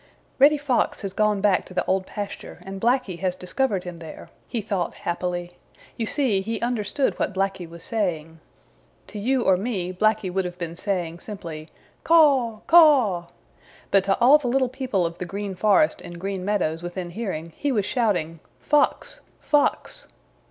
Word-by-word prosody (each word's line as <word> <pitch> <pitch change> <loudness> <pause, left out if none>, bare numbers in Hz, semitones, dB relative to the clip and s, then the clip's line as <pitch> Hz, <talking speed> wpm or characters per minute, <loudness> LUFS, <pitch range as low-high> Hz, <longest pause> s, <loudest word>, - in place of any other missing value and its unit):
"Reddy 295 +3 +6
Fox 280 -6 0
has 195 -1 -4
gone 210 -1 +1
back 200 -2 +3
to 185 - -12
the - - 0
Old 190 0 0
Pasture 205 -1 -6
and 195 0 -7
Blacky 235 -7 +1
has 185 -1 -1
discovered 195 +2 -1
him 175 -2 -8
there," 160 -2 -10 0.2
he 235 - -3
thought 195 -5 -2
happily. 175 0 -4 0.4
You 225 - -3
see, 245 -9 +1
he 225 +2 -3
understood 240 +3 -1
what 195 - -1
Blacky 190 -3 -2
was 170 0 -11
saying. 165 -7 -2 0.7
To 210 - -8
you 250 +4 +1
or 185 - +4
me 190 -4 -3
Blacky 215 -1 +1
would 190 0 +1
have 180 0 -6
been 170 -2 -5
saying 175 -3 -3
simply, 165 -6 -8 0.3
"Caw! 275 -9 +4
Caw!" 265 - +5 0.6
But 195 -1 +5
to 195 0 +2
all 270 +5 +6
the 270 - -4
little 260 +1 +2
people 250 -8 -1
of 170 +1 -5
the 180 - -3
Green 200 +2 -4
Forest 215 +11 +3
and 175 0 -9
Green 195 0 -4
Meadows 175 -5 0
within 175 0 -5
hearing 170 -6 -5
he 290 - -1
was 210 -6 +1
shouting, 180 - 0 0.2
"Fox! 300 +11 +1 0.2
Fox!" 300 +11 0
195 Hz, 170 wpm, -24 LUFS, 180-240 Hz, 0.7 s, Reddy